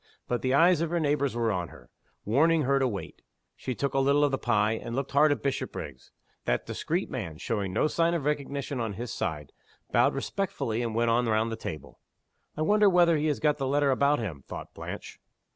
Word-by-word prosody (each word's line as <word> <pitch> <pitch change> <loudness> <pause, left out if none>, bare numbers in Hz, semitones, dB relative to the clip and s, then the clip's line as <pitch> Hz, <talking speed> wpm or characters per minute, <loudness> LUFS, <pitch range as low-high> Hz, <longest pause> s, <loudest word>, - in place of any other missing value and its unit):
But 120 -1 -1
the 130 +1 +1
eyes 170 +2 +5
of 165 - 0
her 170 +1 0
neighbors 145 -4 0
were 115 -2 +1
on 90 -3 -2
her, 60 -2 -16 0.3
warning 155 +8 +3
her 140 +1 +2
to 135 - +2
wait. 100 -6 -6 0.3
She 130 - -4
took 140 +3 -2
a 135 - +2
little 140 +2 +3
of 145 - +3
the 135 - -1
pie, 105 -3 +2
and 115 +1 -4
looked 135 +1 -2
hard 150 +2 +5
at 145 - -1
Bishopriggs. 75 - -4 0.4
That - - 0
discreet - - -2
man, 80 -2 -5
showing 100 +1 -2
no 95 - +1
sign 165 +2 +1
of 150 -5 -2
recognition 140 -2 -2
on 110 -3 -2
his 120 +3 -5
side, 75 -4 -3 0.4
bowed - - +3
respectfully, 145 - -2
and 115 -2 -3
went 115 0 +2
on 120 +1 +2
round 110 +1 +1
the - - -2
table. 80 -7 -8 0.6
"I 155 - 0
wonder 210 +4 +5
whether 175 -2 +5
he 155 0 0
has 150 - 0
got 150 -1 +1
the 135 - -1
letter 140 0 +2
about 140 +3 +3
him?" 85 - -5
thought - - -8
Blanche. - - -8
135 Hz, 215 wpm, -28 LUFS, 110-150 Hz, 0.6 s, eyes